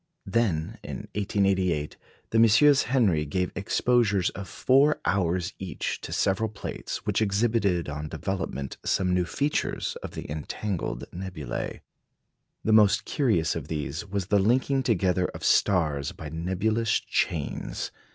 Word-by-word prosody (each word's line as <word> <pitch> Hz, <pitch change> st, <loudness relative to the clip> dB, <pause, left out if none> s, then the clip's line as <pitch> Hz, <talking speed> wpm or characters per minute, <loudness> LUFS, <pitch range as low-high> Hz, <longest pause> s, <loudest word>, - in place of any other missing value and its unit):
Then 95 Hz, -7 st, 0 dB
in -, -, -7 dB
1888 95 Hz, -6 st, 0 dB, 0.4 s
the 115 Hz, -, +3 dB
MM. 130 Hz, +6 st, +6 dB
Henry 105 Hz, -, +2 dB
gave 90 Hz, +5 st, -1 dB
exposures 105 Hz, -2 st, +2 dB
of 95 Hz, -2 st, -8 dB
four 140 Hz, +8 st, +3 dB
hours 90 Hz, -2 st, 0 dB
each 95 Hz, -1 st, -4 dB
to -, -, -7 dB
several 100 Hz, +3 st, +1 dB
plates, 105 Hz, -, -6 dB
which -, -, +1 dB
exhibited 100 Hz, -4 st, +1 dB
on 75 Hz, +1 st, -4 dB
development 80 Hz, -5 st, -4 dB
some 90 Hz, -1 st, +1 dB
new 90 Hz, -1 st, +2 dB
features 145 Hz, +10 st, -1 dB
of -, -, -7 dB
the -, -, -6 dB
entangled 80 Hz, +5 st, -4 dB
nebulæ. 90 Hz, -5 st, -5 dB, 0.8 s
The 110 Hz, -, +2 dB
most 105 Hz, -2 st, +5 dB
curious 110 Hz, -, +1 dB
of 80 Hz, -4 st, -5 dB
these 75 Hz, +1 st, -3 dB
was 100 Hz, -2 st, -3 dB
the 100 Hz, +2 st, +3 dB
linking 130 Hz, +6 st, +2 dB
together 95 Hz, -6 st, +1 dB
of -, -, -8 dB
stars 75 Hz, -8 st, +2 dB
by 75 Hz, -, -8 dB
nebulous 100 Hz, +7 st, 0 dB
chains. -, -, -2 dB
95 Hz, 130 wpm, -27 LUFS, 85-110 Hz, 0.8 s, MM